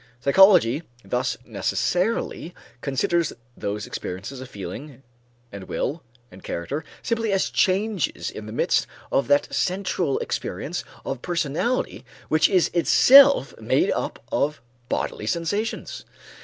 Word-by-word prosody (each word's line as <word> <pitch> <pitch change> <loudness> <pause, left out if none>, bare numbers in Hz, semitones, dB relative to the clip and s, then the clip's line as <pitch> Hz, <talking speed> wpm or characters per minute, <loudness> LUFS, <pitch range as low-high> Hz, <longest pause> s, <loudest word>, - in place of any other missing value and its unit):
Psychology 155 - +5 0.2
thus 125 +1 -1
necessarily 175 - -1 0.3
considers 150 +4 0 0.2
those 105 +1 -4
experiences 110 +9 -6
of 130 - -9
feeling 120 - -8 0.5
and 100 -1 -8
will 155 - -3 0.3
and 95 - -14
character 140 - -4 0.2
simply 230 -2 0
as 195 -1 +1
changes 195 -2 0
in 105 0 -8
the - - -7
midst 115 - +1 0.2
of 135 - +1
that 145 0 +2
central 180 -5 0
experience - - -3 0.2
of 135 -2 -4
personality 175 - -1 0.3
which 155 0 +4
is 185 -4 +3
itself 275 +10 +6
made - - +2
up - - -2
of 150 0 0 0.3
bodily 105 - -2
sensations. 170 - -2
150 Hz, 115 wpm, -24 LUFS, 125-190 Hz, 0.5 s, itself